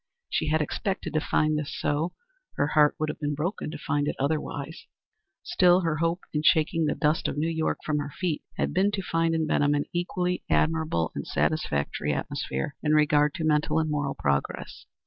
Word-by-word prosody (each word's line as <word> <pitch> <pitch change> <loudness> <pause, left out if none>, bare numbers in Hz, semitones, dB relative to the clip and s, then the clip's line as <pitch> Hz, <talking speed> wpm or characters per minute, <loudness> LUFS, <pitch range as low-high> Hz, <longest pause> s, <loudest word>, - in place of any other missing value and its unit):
She - - 0
had 155 0 +2
expected 195 +5 -3
to 155 - +3
find 155 0 +1
this 150 0 -5
so; 150 +4 0 0.4
her 145 - +1
heart 150 -1 +4
would 155 - -1
have 150 - -5
been 145 -1 -1
broken 160 +4 -3
to 160 - -6
find 145 0 -1
it - - -1
otherwise. 145 +2 -3 0.6
Still, 180 - +4
her 165 -3 0
hope 165 +3 0
in 150 - +1
shaking 160 +1 +3
the 150 - 0
dust 155 0 +1
of - - -3
New 155 +2 +1
York 160 -1 0
from 150 -1 0
her 145 0 -3
feet 165 0 -2 0.2
had - - 0
been 190 +3 +3
to 195 - -2
find 165 -1 +1
in 160 -1 +1
Benham 145 -1 +2
an 145 - 0
equally 180 +1 -1
admirable 160 - +1
and - - -5
satisfactory 75 - 0
atmosphere 70 - -3
in 150 0 +1
regard 150 -1 +4
to 165 - -3
mental 150 0 +2
and 155 -1 +1
moral 145 -2 -1
progress. 70 0 -2
155 Hz, 195 wpm, -27 LUFS, 145-165 Hz, 0.6 s, heart